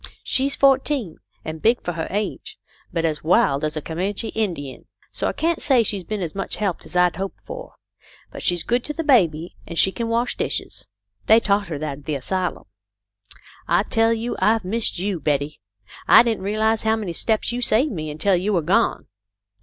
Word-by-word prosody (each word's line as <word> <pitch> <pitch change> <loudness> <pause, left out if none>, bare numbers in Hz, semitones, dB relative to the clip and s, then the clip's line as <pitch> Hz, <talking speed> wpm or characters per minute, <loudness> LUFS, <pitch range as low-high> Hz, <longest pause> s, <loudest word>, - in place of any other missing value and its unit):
She's 275 +1 +1
fourteen, 270 - +2 0.3
and 155 0 -6
big 235 +2 +3
for 175 - -2
her 160 -1 -3
age, 205 +2 -4 0.3
but 165 -1 -1
as 155 -2 -2
wild 145 -4 +3
as 155 0 -1
a 155 - -4
Co 160 - -6
manche 195 +6 -2
Indian. 170 -11 -3 0.3
So - - -2
I - - +1
can't 335 +1 -1
say 260 -5 +4
she's 200 -3 -2
been 210 +1 -4
as 165 - -4
much 195 0 -3
help 200 -5 -1
as - - -10
I'd 180 -1 +3
hoped 195 0 -5
for. - - -9 0.6
But - - -8
she's 175 -2 +1
good 240 +1 0
to 300 - -3
the 330 - -3
baby, 175 - +2
and 170 - -7
she 190 - +5
can 230 +3 -3
wash 235 +2 0
dishes. - - -4 0.4
They 220 +1 +7
taught 200 -3 +1
her 160 -3 -4
that 145 -2 -4
at 145 - -20
the 150 - -2
asylum. 180 +6 -2 1.0
I - - +3
tell 225 0 +2
you 230 +1 -2
I've 220 -2 +2
missed 220 +2 -1
you, 190 0 -2
Betty. 145 0 -1 0.5
I - - +8
didn't 225 -5 -2
realise 220 +2 +1
how 220 0 +2
many 205 -6 -4
steps 220 +7 0
you 245 +1 -3
saved 245 +6 +3
me 155 -6 -4
until 160 +6 +1
you 190 +4 0
were 170 -4 +1
gone. 200 +8 +1
200 Hz, 200 wpm, -22 LUFS, 165-230 Hz, 1.0 s, I